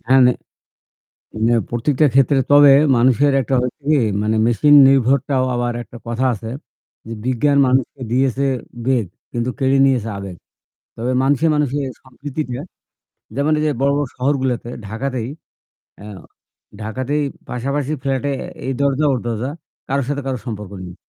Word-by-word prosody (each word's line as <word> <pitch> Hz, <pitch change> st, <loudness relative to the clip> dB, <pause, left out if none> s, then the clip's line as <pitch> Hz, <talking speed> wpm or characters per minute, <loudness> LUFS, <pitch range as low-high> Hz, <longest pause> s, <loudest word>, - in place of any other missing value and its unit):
হ্যাঁ। 130 Hz, +1 st, +6 dB
নে 125 Hz, -, +4 dB, 1.1 s
হ্যাঁ, 120 Hz, -1 st, +3 dB
প্রত্যেকটা 130 Hz, +5 st, +1 dB
ক্ষেত্রে 135 Hz, +1 st, +4 dB
তবে 145 Hz, -1 st, +8 dB, 0.2 s
মানুষের 130 Hz, +4 st, +3 dB
একটা 135 Hz, +1 st, -1 dB
হচ্ছে 125 Hz, +4 st, -4 dB
কি 150 Hz, -, +4 dB, 0.2 s
মানে 110 Hz, +1 st, 0 dB
মেশিন 120 Hz, +6 st, +4 dB
নির্ভরটাও 135 Hz, 0 st, +2 dB
আবার 120 Hz, 0 st, -1 dB
একটা 120 Hz, -, -13 dB
কথা 120 Hz, +3 st, -2 dB
আছে 110 Hz, +2 st, -7 dB, 0.6 s
যে, 115 Hz, -, -6 dB
"বিজ্ঞান 140 Hz, +3 st, +2 dB
মানুষকে 130 Hz, +1 st, 0 dB
দিয়েছে 130 Hz, +1 st, +1 dB, 0.4 s
বেগ 130 Hz, -4 st, +2 dB, 0.3 s
কিন্তু 120 Hz, +1 st, -2 dB
কেড়ে 135 Hz, 0 st, +2 dB
নিয়েছে 125 Hz, -5 st, +1 dB
আবেগ" 95 Hz, -2 st, -7 dB, 0.6 s
তবে 120 Hz, +3 st, -2 dB
মানুষে, 140 Hz, +3 st, +2 dB
মানুষে 145 Hz, -1 st, 0 dB, 0.2 s
সম্প্রীতিটা 135 Hz, 0 st, -6 dB, 0.8 s
যেমন 145 Hz, +3 st, +1 dB
এইযে 155 Hz, -1 st, +1 dB
বড়ো 140 Hz, 0 st, +3 dB
বড়ো 145 Hz, -, 0 dB
শহরগুলোতে 130 Hz, -3 st, -1 dB, 0.2 s
ঢাকাতেই 125 Hz, +2 st, -3 dB, 0.7 s
এ্যা 105 Hz, -, -10 dB, 0.7 s
ঢাকাতেই 130 Hz, +7 st, -2 dB, 0.3 s
পাশাপাশি 140 Hz, +4 st, -2 dB
ফ্ল্যাটে 135 Hz, +1 st, -1 dB, 0.3 s
এই 135 Hz, -, -1 dB
দরজা 140 Hz, +1 st, +1 dB
ওর 125 Hz, -, 0 dB
দরজা, 120 Hz, +3 st, -2 dB, 0.4 s
কারোর 135 Hz, -1 st, -1 dB
সাথে 145 Hz, 0 st, -2 dB
কারো 130 Hz, -2 st, -2 dB
সম্পর্ক 105 Hz, -4 st, -6 dB, 0.2 s
নেই। 90 Hz, -, -10 dB
130 Hz, 140 wpm, -19 LUFS, 120-140 Hz, 1.1 s, তবে